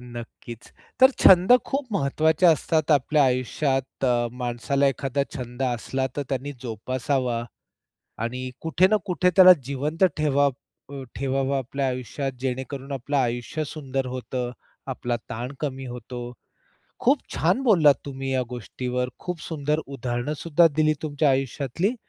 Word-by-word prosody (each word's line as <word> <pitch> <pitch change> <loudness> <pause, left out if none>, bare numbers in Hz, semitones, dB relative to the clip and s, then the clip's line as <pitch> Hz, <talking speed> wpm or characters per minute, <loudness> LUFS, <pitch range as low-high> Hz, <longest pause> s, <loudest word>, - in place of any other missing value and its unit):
नक्कीच. 120 -1 -10 0.3
तर 260 +1 +8
छंद 185 +4 +7
खूप 275 -1 -2
महत्त्वाचे 155 +1 +2
असतात 160 -1 +2
आपल्या 145 0 +4
आयुष्यात. 130 +1 -1
अ, 120 -2 +2
माणसाला 125 +3 0
एखादा 135 0 -2 0.2
छंद 125 +1 -6
असला, 130 +1 -1
तर 145 - 0
त्यांनी 140 +1 -3
जोपासावा 125 +1 -2 0.8
आणि 125 +2 -4
कुठे 165 +3 +3
ना 215 - +5
कुठे 180 -1 +2
त्याला 185 -1 +10
जिवंत 145 +6 0
ठेवावं 145 -2 +2 0.4
अ, 140 -1 -6
ठेवावा 135 +2 0
आपल्या 135 +1 -2
आयुष्यात, 130 +2 -3
जेणेकरून 130 +2 -4
आपलं 140 +2 -2
आयुष्य 125 +4 -1
सुंदर 135 -3 -4
होतं, 125 -1 -4 0.4
आपला 120 -1 -2
ताण 120 +4 -4
कमी 135 -3 -4
होतो. 120 0 -7 0.7
खूप 275 +4 +4 0.2
छान 180 - +1
बोललात 170 - +6
तुम्ही 135 -1 -5
या 130 -1 +1
गोष्टीवर. 125 +2 -3
खूप 180 -2 -5
सुंदर 150 -1 -1
उदाहरण 125 0 -3
सुद्धा 170 +1 +4
दिली 155 0 +3
तुमच्या 150 -1 +1
आयुष्यातली. 135 - -1
135 Hz, 135 wpm, -24 LUFS, 125-150 Hz, 0.8 s, त्याला